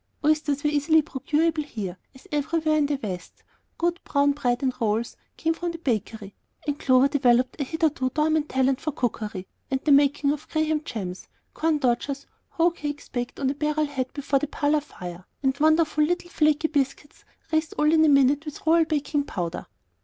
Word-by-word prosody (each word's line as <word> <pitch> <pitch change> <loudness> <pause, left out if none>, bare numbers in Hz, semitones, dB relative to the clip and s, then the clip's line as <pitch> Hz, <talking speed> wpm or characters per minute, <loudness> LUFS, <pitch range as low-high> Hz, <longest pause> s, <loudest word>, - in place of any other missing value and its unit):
Oysters 300 -2 +1
were 295 - +2
easily 305 +2 +3
procurable 310 +3 0
there, 190 -5 -3 0.2
as 260 - -16
everywhere 310 +1 +1
in 300 -2 +2
the 285 -2 -1
West; 180 -4 -6 0.3
good 345 +1 0
brown 285 0 +2
bread 245 -3 -1
and 260 -1 +1
rolls 225 +1 0 0.2
came 325 0 +1
from 345 +1 -4
the - - -6
bakery; 220 - -3 0.3
and 290 -1 -2
Clover 255 0 +4
developed 255 0 +2
a - - +2
hitherto 300 -2 0
dormant 310 0 +1
talent 265 +1 +1
for 310 - -2
cookery 215 -8 -3 0.2
and 265 -1 0
the 300 - +2
making 280 0 +4
of 300 +1 -5
Graham 310 -1 0
gems, 190 - -6 0.3
corn 320 -1 +1
dodgers, 275 +1 -1 0.2
hoe 335 +1 +2
cakes 295 -3 -6
baked 245 -1 -4
on 270 -1 +1
a - - -3
barrel 300 +1 0
head 265 -3 -3
before 280 -1 0
the 295 - -2
parlor 295 +1 +1
fire, 180 - -9 0.2
and 265 0 +2
wonderful 310 0 +3
little 350 +2 -1
flaky 305 0 +2
biscuits 280 0 -2 0.3
raised 315 0 0
all 300 +1 +3
in 315 -1 +5
a 310 - +5
minute 275 +1 +4
with 300 -1 -9
Royal 325 +1 +5
Baking 295 -1 0
Powder. 175 -6 -4
290 Hz, 185 wpm, -25 LUFS, 260-310 Hz, 0.3 s, in